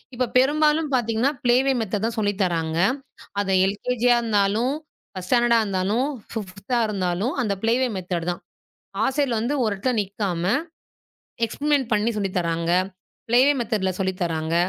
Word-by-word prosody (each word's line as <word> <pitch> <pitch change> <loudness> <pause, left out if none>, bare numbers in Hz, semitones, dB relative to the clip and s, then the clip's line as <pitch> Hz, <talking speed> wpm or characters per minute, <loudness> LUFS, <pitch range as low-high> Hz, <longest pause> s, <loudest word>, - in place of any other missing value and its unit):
இப்ப 250 0 0
பெரும்பாலும் 300 +3 +3
பாத்தீங்கன்னா 235 +2 +1
ப்ளே 240 -1 +4
வே 275 - +3
மெத்தேடு 210 -1 -2
தான் 230 0 -5
சொல்லித் 205 -1 0
தராங்க. 165 -3 0 0.6
அது 200 -1 0 0.2
LKGஆ 245 +4 0
இருந்தாலும், 220 +3 +1 0.4
1 185 -1 -8
ஸ்டேண்டர்டா 240 -1 +4
இருந்தாலும், 205 +7 0 0.2
5 210 +2 -3
இருந்தாலும் 195 +3 -1
அந்த 210 -3 0
ப்ளே 225 +1 +3
வே 260 - +2
மெத்தேடு 175 -2 -3
தான். 175 - -7 0.6
ஆசிரியர் 265 -3 +1
வந்து 240 +6 -1
ஒரு 215 - +1
இடத்துல 250 +6 -1
நிக்காம 195 -3 -3 1.0
எக்ஸ்பெரிமென்ட் 285 +2 0
பண்ணி 210 +2 +2
சொல்லித் 195 -3 -2
தராங்க. 170 -1 0 0.6
ப்ளே 240 +2 +4
வே - - +6
மெத்தேடுல 210 -5 -1
சொல்லித் 190 -1 -2
தராங்க. 160 -1 -1
210 Hz, 145 wpm, -23 LUFS, 185-245 Hz, 1.0 s, வே